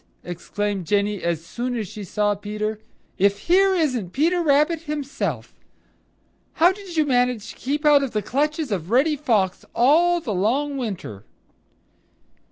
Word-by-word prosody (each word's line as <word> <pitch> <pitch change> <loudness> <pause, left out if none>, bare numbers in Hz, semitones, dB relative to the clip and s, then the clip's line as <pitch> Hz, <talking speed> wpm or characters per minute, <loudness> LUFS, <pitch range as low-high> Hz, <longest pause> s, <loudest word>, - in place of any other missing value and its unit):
exclaimed 190 +1 -4
Jenny 205 0 0
as 170 -1 -2
soon 245 +5 -3
as 215 -3 -3
she 210 +3 -8
saw 205 +2 0
Peter. 210 +1 -4 0.4
"If 200 +1 +2
here 380 +2 +4
isn't 255 - -1
Peter 340 +5 +2
Rabbit 300 +1 +2
himself! 275 - -4 1.0
How 350 +1 +5
did 380 -3 -9
you 310 - +3
manage 245 -4 0
to - - -14
keep 295 +4 -3
out 295 -1 +6
of 275 - -1
the 210 -2 -2
clutches 300 0 -1
of 180 -4 -3
Reddy 275 +7 +3
Fox 220 -10 0
all 335 +8 +4
the 250 -10 -4
long 260 +10 0
winter?" 190 - -5
245 Hz, 150 wpm, -23 LUFS, 205-300 Hz, 1.0 s, out